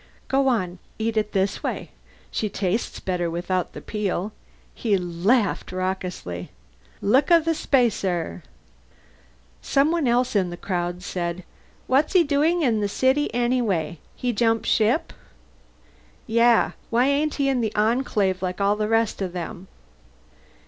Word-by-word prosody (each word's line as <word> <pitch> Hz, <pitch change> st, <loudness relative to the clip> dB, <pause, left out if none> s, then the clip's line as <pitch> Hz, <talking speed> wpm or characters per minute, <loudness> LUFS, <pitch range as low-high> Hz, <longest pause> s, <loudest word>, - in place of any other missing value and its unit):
"Go 270 Hz, 0 st, +2 dB
on. 185 Hz, -8 st, 0 dB, 0.2 s
Eat 225 Hz, 0 st, -1 dB
it 210 Hz, -1 st, 0 dB
this 195 Hz, 0 st, 0 dB
way. -, -, -4 dB, 0.4 s
She 215 Hz, -, -1 dB
tastes 195 Hz, +3 st, -2 dB
better 180 Hz, -2 st, -1 dB
without 175 Hz, +2 st, -2 dB
the -, -, -8 dB
peel." 210 Hz, -1 st, -2 dB, 0.4 s
He 210 Hz, -4 st, +1 dB
laughed 185 Hz, +6 st, 0 dB
raucously. 185 Hz, -, -4 dB, 0.5 s
"Looka 275 Hz, -, +5 dB
the 330 Hz, 0 st, 0 dB
spacer!" 200 Hz, -, 0 dB, 1.2 s
Someone 300 Hz, +1 st, +2 dB
else 245 Hz, 0 st, +2 dB
in 190 Hz, -3 st, +2 dB
the 175 Hz, -, -7 dB
crowd 175 Hz, -1 st, -3 dB
said, 175 Hz, -1 st, -3 dB, 0.4 s
"What's 275 Hz, +7 st, +2 dB
he 365 Hz, -3 st, +6 dB
doing 315 Hz, +4 st, +2 dB
in 230 Hz, -6 st, +2 dB
the 205 Hz, -, 0 dB
city 260 Hz, +7 st, +1 dB
anyway? 230 Hz, -10 st, 0 dB, 0.2 s
He 245 Hz, -1 st, -1 dB
jump 225 Hz, 0 st, +1 dB
ship?" 230 Hz, +8 st, +2 dB, 1.1 s
"Yeah? 230 Hz, 0 st, +4 dB, 0.2 s
Why 240 Hz, +2 st, +3 dB
ain't 290 Hz, +2 st, +1 dB
he 280 Hz, -1 st, +1 dB
in 265 Hz, -3 st, +1 dB
the 220 Hz, -2 st, -1 dB
Enclave 210 Hz, -4 st, +1 dB
like 185 Hz, 0 st, -3 dB
all 200 Hz, +1 st, +3 dB
the 210 Hz, 0 st, -1 dB
rest 225 Hz, -2 st, +1 dB
of 185 Hz, -2 st, -3 dB
them?" 180 Hz, +1 st, -6 dB
215 Hz, 135 wpm, -24 LUFS, 185-255 Hz, 1.2 s, he